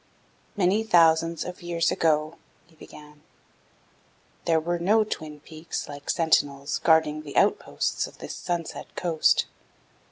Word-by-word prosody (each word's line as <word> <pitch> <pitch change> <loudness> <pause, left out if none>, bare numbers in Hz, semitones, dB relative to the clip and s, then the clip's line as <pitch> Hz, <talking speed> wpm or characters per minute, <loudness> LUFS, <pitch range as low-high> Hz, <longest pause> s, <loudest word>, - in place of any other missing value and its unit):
"Many 195 +2 +2
thousands 165 -4 +3
of 180 0 -8
years 170 -1 0
ago," 155 0 0 0.3
he 165 -1 -25
began, 150 -1 -14 1.2
"there 165 -1 +3
were 170 +2 -2
no 210 +6 +3
twin 155 -7 -6
peaks 160 +1 -6
like 145 0 -10
sentinels 145 -4 +1
guarding 160 -2 +3
the 145 -2 -7
outposts - - +1
of - - -16
this - - -7
sunset 170 -2 -5
coast. 165 -3 +2
160 Hz, 125 wpm, -25 LUFS, 155-175 Hz, 1.2 s, thousands